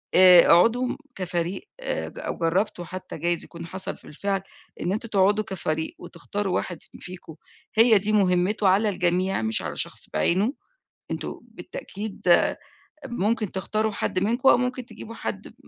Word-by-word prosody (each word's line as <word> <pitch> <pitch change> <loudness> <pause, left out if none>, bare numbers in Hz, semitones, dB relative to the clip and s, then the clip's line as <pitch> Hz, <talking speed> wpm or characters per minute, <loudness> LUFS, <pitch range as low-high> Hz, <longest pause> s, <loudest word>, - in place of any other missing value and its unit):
آآ 180 -1 +10
اقعدوا 230 +9 +5 0.3
كفريق، 180 - -3
آآ - - -2
ج - - -11
أو - - -4
جرّبتوا 175 +2 0
حتّى 185 +2 -7
جايز 175 -1 -1
يكون 170 -1 -9
حصل 190 +3 -5
في - - -21
الفعل 195 +5 -2 0.4
إن 180 - -1
أنتم 220 +2 -4
تقعدوا 205 +1 +3
كفريق 160 -4 -3
وتختاروا 195 +3 -4
واحد 175 -3 -3
ف - - -18
فيكم، 180 -3 -9 0.4
هي 225 0 +7
دي 210 +2 -1
مهمته 190 +1 +2
على 205 +3 +3
الجميع 185 - 0
مش 110 -2 0
على 80 -2 -4
شخص - - -4
بعينه. 185 - +2 0.6
أنتم - - -4
بالتأكيد 215 - -8 0.9
ممكن 220 -3 -1
تختاروا 215 +3 -1
حد 185 - -1
منكم 235 +7 +3
أو - - +7
ممكن 250 0 -2
تجيبوا 230 -1 -10
حد - - -5
م - - -15
190 Hz, 155 wpm, -25 LUFS, 175-215 Hz, 0.9 s, آآ